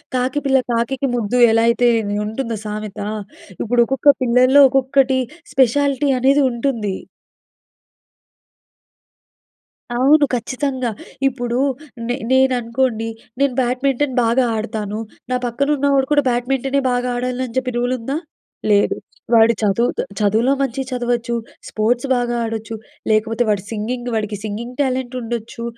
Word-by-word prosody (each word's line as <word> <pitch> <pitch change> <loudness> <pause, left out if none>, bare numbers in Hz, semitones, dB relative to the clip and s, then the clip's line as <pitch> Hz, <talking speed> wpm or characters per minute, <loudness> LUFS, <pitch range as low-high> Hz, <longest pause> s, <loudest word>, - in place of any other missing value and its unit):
కాకి 255 +3 0
పిల్ల 265 -1 +4
కాకికి 250 +4 0
ముద్దు 240 +1 -1
ఎలా 225 0 +3
అయితే 240 +1 +3 0.4
ఉంటుందో 230 +2 -3
సామెత. 210 -1 -5 0.6
ఇప్పుడు 240 +2 +2
ఒక్కొక్క 270 +2 +4
పిల్లల్లో 255 +3 +5
ఒక్కొక్కటి 265 0 +2 0.3
స్పెషాలిటీ 275 +2 +2
అనేది 275 +3 +4
ఉంటుంది. 235 -5 -2 3.0
అవును. 285 +5 +4
ఖచ్చితంగా. 255 0 -2 0.4
ఇప్పుడు 245 -2 -2 0.5
నే 245 - 0 0.2
నేననుకోండి 245 -3 +1 0.3
నేను 280 -2 +2
బ్యాడ్మింటన్ 260 +2 0
బాగా 235 +3 +2
ఆడతాను. 215 -1 -3 0.3
నా 255 - +2
పక్కన 245 +4 -1
ఉన్నవాడు 275 -1 +2
కూడా 290 -1 +4
బ్యాడ్మింటనే 265 +3 0
బాగా 245 0 0
ఆడాలి 250 +1 -2
అని 240 -1 -10
చెప్పి 255 -1 0
రూల్ 245 +1 0
ఉందా? 270 +6 -3 0.5
లేదు. 205 0 +3 0.4
వాడు 225 0 +6
చదువుతొ 215 +4 +1 0.2
చదువులో 220 +5 +2
మంచిగా 270 0 -2
చదవచ్చు. 240 -1 -1 0.4
స్పోర్ట్స్ 240 +5 0
బాగా 240 -1 -1
ఆడొచ్చు. 225 0 -5 0.3
లేకపోతే 225 +2 +2
వాడు 200 -2 +1
సింగింగ్ 240 +3 -3
వాడికి 210 -1 -2
సింగింగ్ 225 +4 -5
టాలెంట్ 260 -2 -1
ఉండొచ్చు. 230 0 -5
245 Hz, 120 wpm, -19 LUFS, 230-265 Hz, 3.0 s, వాడు